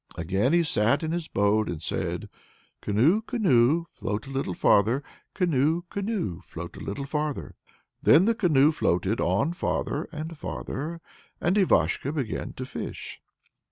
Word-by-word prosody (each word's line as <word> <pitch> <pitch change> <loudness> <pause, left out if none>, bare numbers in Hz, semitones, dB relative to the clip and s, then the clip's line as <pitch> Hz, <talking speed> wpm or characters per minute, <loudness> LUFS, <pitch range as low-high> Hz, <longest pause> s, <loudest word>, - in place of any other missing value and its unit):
Again 95 - +1
he 170 0 +4
sat 120 -1 +1
in 160 - -1
his 170 -1 -2
boat 105 +2 +2
and 85 - -4
said: 80 - -3 0.5
Canoe, 135 - +3
canoe, 165 - +3
float 105 +5 -4
a 135 - -9
little 135 -10 -2
farther, 115 +7 +3 0.3
Canoe, 165 -2 +2
canoe, 195 - -2
float 85 0 -8
a - - -9
little 135 +8 -4
farther. 150 0 -3 0.5
Then 175 - +6
the 230 - +3
canoe 155 -8 +4
floated 95 - 0
on 105 - +1
farther 170 -3 -2
and 160 +1 -6
farther, 160 +1 -5 0.4
and 175 - +1
Ivashko 180 -7 +2
began 135 -8 -3
to - - -6
fish. - - -6
145 Hz, 145 wpm, -26 LUFS, 105-170 Hz, 0.5 s, Then